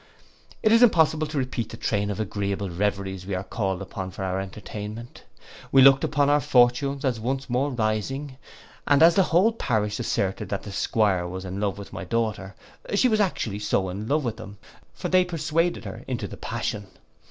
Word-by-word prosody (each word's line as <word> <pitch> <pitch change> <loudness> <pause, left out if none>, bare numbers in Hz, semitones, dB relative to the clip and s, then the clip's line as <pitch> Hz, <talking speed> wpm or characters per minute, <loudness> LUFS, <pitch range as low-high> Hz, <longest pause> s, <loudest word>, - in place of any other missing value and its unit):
It 215 - +4
is 230 +1 +6
impossible 160 -8 +4
to 150 0 -5
repeat 130 -4 -2
the - - -8
train 105 -1 -1
of 100 - -4
agreeable 100 -2 -2
reveries 95 0 -2
we 100 - -2
called 95 0 -3
up 95 -1 -6
for 95 - -5
our 95 0 -1
entertainment. 105 +4 -7 0.5
We 135 -1 +7
looked 135 0 +7
upon 145 -2 +2
our 145 +1 +4
fortunes 135 +2 +2
as 125 -4 0
once 130 +3 -3
more 130 +4 +1
rising; 130 +4 -2 0.5
and 145 +2 +5
as 170 +1 +8
the 195 - +4
whole 185 +7 +4
parish 110 - -1
asserted 100 -5 -1
that 100 - -3
the 105 - -8
'Squire 95 -3 +1
was 95 +1 -6
in 95 +1 -5
love 100 -2 -1
with 100 - -10
my - - -5
daughter, 105 -1 -2 0.4
she 250 +5 +4
was 215 -2 +2
actually 120 - -1
so 105 -1 +1
with 115 +4 -2
him; 105 -2 -9 0.4
for - - -4
they 185 0 +4
persuaded 165 0 -1
her - - -7
into - - -3
the - - -9
passion. 100 -1 -4
110 Hz, 185 wpm, -25 LUFS, 100-145 Hz, 0.5 s, as